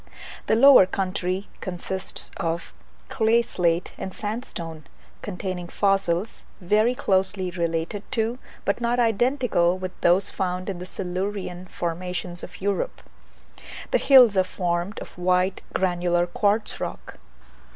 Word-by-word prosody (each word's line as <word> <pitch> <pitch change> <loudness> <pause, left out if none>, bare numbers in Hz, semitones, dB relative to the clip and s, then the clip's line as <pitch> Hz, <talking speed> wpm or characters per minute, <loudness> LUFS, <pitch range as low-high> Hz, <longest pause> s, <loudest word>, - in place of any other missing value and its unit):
The - - +4
lower 260 -5 +8
country 185 0 -2
consists 185 0 -4
of 165 0 -3 0.3
clay 230 +1 +3
slate 175 -6 0
and 190 - -4
sandstone, 175 - -5 0.4
containing 185 -3 -4
fossils, 195 +1 0 0.2
very 215 +6 +2
closely 190 -3 0
related 170 +3 -2
to, 230 +1 0 0.3
but 200 +4 0
not 240 +1 +1
identical 230 -6 +2
with, 185 -1 -5
those 180 +3 +3
found 185 0 -2
in 180 - -7
the 180 - -7
Silurian 185 0 -4
formations 175 +1 -4
of 185 +3 -10
Europe; 200 0 -2 0.9
the - - +3
hills 250 -6 +7
are 190 - +4
formed 180 +1 -2
of - - -9
white 180 +1 +1
granular 175 -1 +1
quartz 205 +4 0
rock. - - -6
185 Hz, 120 wpm, -24 LUFS, 175-210 Hz, 0.9 s, lower